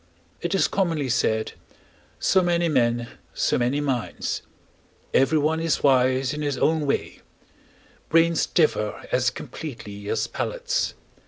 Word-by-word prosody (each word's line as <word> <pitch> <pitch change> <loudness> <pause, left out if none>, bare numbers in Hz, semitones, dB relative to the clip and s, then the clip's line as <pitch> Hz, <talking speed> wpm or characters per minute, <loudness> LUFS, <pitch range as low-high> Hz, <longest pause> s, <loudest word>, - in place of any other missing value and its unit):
It 175 +3 -1
is 195 - +3
commonly 165 -8 0
said: 110 -2 +1 0.7
"So 190 - +3
many 175 -1 +1
men, 120 -5 +1 0.3
so - - +1
many 125 +4 +1
minds; 135 -5 -2 0.7
everyone 155 +3 +3
is 165 -1 0
wise 130 -1 +3
in 150 - -4
his 145 -3 -1
own 155 0 +1
way; 140 - -2 0.9
brains 165 +1 +3
differ 130 -10 +1
as 125 0 +3
completely 105 -10 -8
as 110 0 0
palates." - - -2
145 Hz, 120 wpm, -24 LUFS, 125-165 Hz, 0.9 s, is